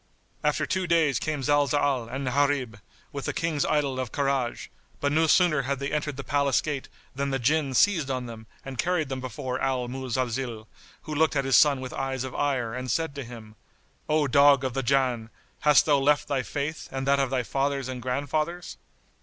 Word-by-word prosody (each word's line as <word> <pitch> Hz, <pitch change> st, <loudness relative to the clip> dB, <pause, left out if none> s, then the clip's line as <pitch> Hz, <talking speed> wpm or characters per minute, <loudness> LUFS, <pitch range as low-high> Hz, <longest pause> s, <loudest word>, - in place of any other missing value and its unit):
After -, -, +1 dB
two 190 Hz, -1 st, -1 dB
days 160 Hz, -6 st, +3 dB
came 150 Hz, -3 st, -3 dB
Zalzal 145 Hz, -3 st, +1 dB
and 135 Hz, +2 st, -4 dB
Gharib, 135 Hz, -4 st, 0 dB, 0.3 s
with 140 Hz, -1 st, -5 dB
the -, -, -2 dB
King's 165 Hz, -3 st, 0 dB
idol 140 Hz, -4 st, 0 dB
of 130 Hz, -3 st, -3 dB
Karaj, 135 Hz, -4 st, -1 dB, 0.3 s
but 145 Hz, -, 0 dB
no 160 Hz, +2 st, +3 dB
sooner 170 Hz, -3 st, +4 dB
had 135 Hz, +1 st, -2 dB
they 140 Hz, +2 st, -4 dB
entered 150 Hz, -2 st, -2 dB
the 140 Hz, -, -5 dB
palace 140 Hz, -1 st, +2 dB
gate 145 Hz, -3 st, -4 dB, 0.2 s
than 140 Hz, +1 st, -2 dB
the 135 Hz, -, 0 dB
Jinn 135 Hz, +2 st, +1 dB
seized 175 Hz, -7 st, +3 dB
on 130 Hz, -2 st, -2 dB
them 110 Hz, -2 st, -9 dB, 0.2 s
and 135 Hz, -3 st, -7 dB
carried 170 Hz, -3 st, 0 dB
them 130 Hz, -1 st, -4 dB
before 130 Hz, +1 st, -4 dB
Al 130 Hz, -2 st, 0 dB
Muzalzil, 125 Hz, -2 st, -3 dB, 0.4 s
who 155 Hz, -, -6 dB
looked 155 Hz, +1 st, +2 dB
at 140 Hz, -1 st, +1 dB
his 135 Hz, -, +3 dB
son 140 Hz, -3 st, +5 dB
with 130 Hz, -, -6 dB
eyes 135 Hz, -1 st, -2 dB
of 130 Hz, -1 st, -6 dB
ire 130 Hz, -6 st, -1 dB
and 125 Hz, 0 st, -5 dB
said 160 Hz, +5 st, -1 dB
to 140 Hz, -1 st, -5 dB
him, 115 Hz, -3 st, -11 dB, 0.5 s
"O 150 Hz, -1 st, +3 dB
dog 140 Hz, +1 st, +5 dB
of 130 Hz, -2 st, -2 dB
the 135 Hz, -, -1 dB
Jann, 125 Hz, -3 st, +1 dB, 0.3 s
hast 150 Hz, -2 st, +5 dB
thou 145 Hz, -2 st, +4 dB
left 145 Hz, +1 st, +2 dB
thy 140 Hz, -2 st, 0 dB
Faith 145 Hz, +5 st, -4 dB
and 135 Hz, 0 st, -3 dB
that 140 Hz, 0 st, +3 dB
of 135 Hz, -2 st, +1 dB
thy 130 Hz, -1 st, 0 dB
fathers 135 Hz, +1 st, -1 dB
and 130 Hz, -1 st, -5 dB
grandfathers?" 150 Hz, +7 st, -2 dB
135 Hz, 200 wpm, -26 LUFS, 130-145 Hz, 0.5 s, son